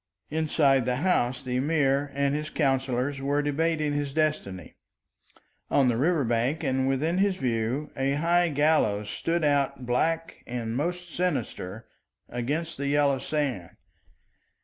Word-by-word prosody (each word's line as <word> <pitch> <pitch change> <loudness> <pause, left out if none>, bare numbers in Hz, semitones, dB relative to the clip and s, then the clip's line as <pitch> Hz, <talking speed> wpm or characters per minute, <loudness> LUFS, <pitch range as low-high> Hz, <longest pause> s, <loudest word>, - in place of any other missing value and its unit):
Inside 150 -4 +2
the 125 0 0
house 130 -5 +1
the 125 -1 -2
Emir 140 0 +1
and 140 0 +1
his 150 +1 -2
counsellors 135 -2 0
were 145 +2 0
debating 155 0 0
his 145 -1 -2
destiny; 150 - -1 1.0
on 135 -3 +4
the 120 - +1
river 155 +3 +2
bank 120 +7 0
and 130 -2 +1
within 155 +7 0
his 195 -1 +2
view 125 +3 -1
a 135 0 0
high 170 +4 +2
gallows 140 -9 +2
stood 170 0 -1
out 140 -3 +1
black 165 +7 -1
and 120 -2 -3
most 175 +4 -3
sinister 115 - -2 0.4
against 150 +8 -3
the 140 +1 -2
yellow 140 -1 +2
sand. 135 - -3
140 Hz, 135 wpm, -27 LUFS, 125-155 Hz, 1.0 s, on